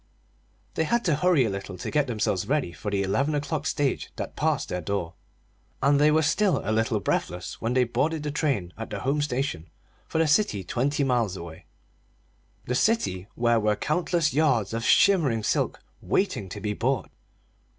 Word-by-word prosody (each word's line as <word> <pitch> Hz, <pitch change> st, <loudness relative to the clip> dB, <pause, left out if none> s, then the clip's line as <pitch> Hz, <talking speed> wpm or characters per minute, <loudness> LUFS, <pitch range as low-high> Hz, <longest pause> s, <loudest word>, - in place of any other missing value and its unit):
They 160 Hz, -, 0 dB
had 235 Hz, +7 st, 0 dB
to 165 Hz, -5 st, +3 dB
hurry 160 Hz, -4 st, +3 dB
a -, -, 0 dB
little 95 Hz, -1 st, -6 dB
to -, -, -5 dB
get 150 Hz, -2 st, +2 dB
themselves 105 Hz, -6 st, -1 dB
ready 145 Hz, -, 0 dB
for 105 Hz, -, -5 dB
the 100 Hz, -1 st, 0 dB
eleven 135 Hz, +10 st, 0 dB
o'clock 145 Hz, +1 st, -2 dB
stage 145 Hz, -2 st, -1 dB
that -, -, -6 dB
passed -, -, 0 dB
their 90 Hz, -, -2 dB
door; 90 Hz, -1 st, -3 dB, 0.7 s
and 140 Hz, +1 st, +3 dB
they 150 Hz, -, +6 dB
were 155 Hz, +1 st, +3 dB
still 200 Hz, +5 st, +2 dB
a 105 Hz, -, -1 dB
little 110 Hz, 0 st, +1 dB
breathless 90 Hz, -2 st, -3 dB
when 115 Hz, +2 st, -1 dB
they 130 Hz, -, +5 dB
boarded 150 Hz, +6 st, -1 dB
the 150 Hz, -, -2 dB
train 135 Hz, -, -1 dB
at 115 Hz, -, -5 dB
the -, -, -5 dB
home 140 Hz, +3 st, 0 dB
station 125 Hz, -, -2 dB, 0.4 s
for -, -, -3 dB
the 165 Hz, -, +4 dB
city 150 Hz, -, +2 dB
twenty 140 Hz, +9 st, 0 dB
miles 120 Hz, -8 st, +1 dB
away 85 Hz, -2 st, -10 dB, 1.0 s
the 125 Hz, -, -2 dB
city 125 Hz, -, +1 dB
where 120 Hz, -1 st, +2 dB
were 105 Hz, -1 st, +1 dB
countless 165 Hz, -, 0 dB
yards 130 Hz, -9 st, +2 dB
of 115 Hz, 0 st, -2 dB
shimmering 145 Hz, -, +4 dB
silk -, -, 0 dB, 0.2 s
waiting 130 Hz, -, -1 dB
to 105 Hz, -, -6 dB
be 105 Hz, +1 st, -2 dB
bought. 130 Hz, +4 st, -1 dB
130 Hz, 180 wpm, -26 LUFS, 105-150 Hz, 1.0 s, they